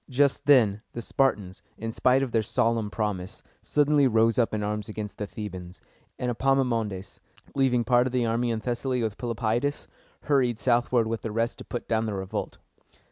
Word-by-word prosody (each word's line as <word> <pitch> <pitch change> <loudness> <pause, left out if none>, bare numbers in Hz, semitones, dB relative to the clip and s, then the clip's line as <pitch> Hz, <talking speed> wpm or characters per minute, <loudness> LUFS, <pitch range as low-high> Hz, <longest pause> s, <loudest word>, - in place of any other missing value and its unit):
Just 140 +2 +1
then 110 -8 +5
the 120 - -5
Spartans, 105 -10 0 0.2
in 115 +1 -4
spite 130 +3 +3
of 130 - -3
their 115 - +2
solemn 115 +1 0
promise, 105 -1 -3 0.2
suddenly 145 -1 +3
rose 115 0 +3
up 115 - +2
in 110 -1 -2
arms 105 0 -3
against 105 -1 -6
the 105 - -3
Thebans; 95 -4 -7 0.4
and 125 -1 -1
Epaminondas, 115 -7 0 0.3
leaving 130 -3 +2
part 120 +1 +3
of - - -4
the 125 -1 +1
army 115 +1 0
in 115 -1 -1
Thessaly 125 +1 -1
with 110 -2 -3
Pelopidas, 120 +3 -1 0.3
hurried 130 -6 +2
southward 120 -1 +2
with 115 0 -3
the 115 - -4
rest 115 +2 -1
to - - -9
put 120 - -5
down 110 -1 0
the 105 - -2
revolt. 95 0 -4
115 Hz, 180 wpm, -26 LUFS, 105-125 Hz, 0.4 s, then